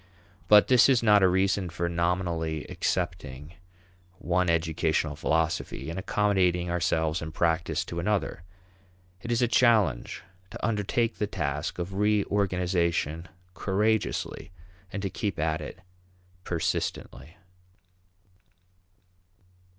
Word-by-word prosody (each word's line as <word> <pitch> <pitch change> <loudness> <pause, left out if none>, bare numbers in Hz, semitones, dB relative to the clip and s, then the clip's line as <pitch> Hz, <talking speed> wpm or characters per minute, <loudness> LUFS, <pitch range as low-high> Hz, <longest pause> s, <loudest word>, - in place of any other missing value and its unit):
But 105 -1 +7
this 125 0 +6
is 125 -3 +3
not 105 -2 +6
a 95 - +6
reason 95 0 +1
for 85 +1 -2
nominally 85 -2 -1
accepting 80 -4 -3 0.6
one 90 0 0
educational 80 -2 0
philosophy 80 +1 -1
and 85 - -4
accommodating 90 -4 +1
ourselves 80 -2 0
in 80 -1 -5
practice 80 0 0
to 85 - -5
another. 100 -1 -1 0.8
It 120 - -5
is 120 +1 +2
a - - +3
challenge 110 - +2 0.3
to - - -5
undertake 115 +2 0
the 105 - 0
task 75 -7 -3
of 90 +2 -4
reorganization 90 -5 0 0.3
courageously 105 +3 -1 0.4
and 100 - -5
to 95 - -1
keep 100 -5 -3
at 80 0 -1
it - - -8 0.7
persistently. 85 -2 -3
90 Hz, 110 wpm, -27 LUFS, 80-100 Hz, 0.8 s, But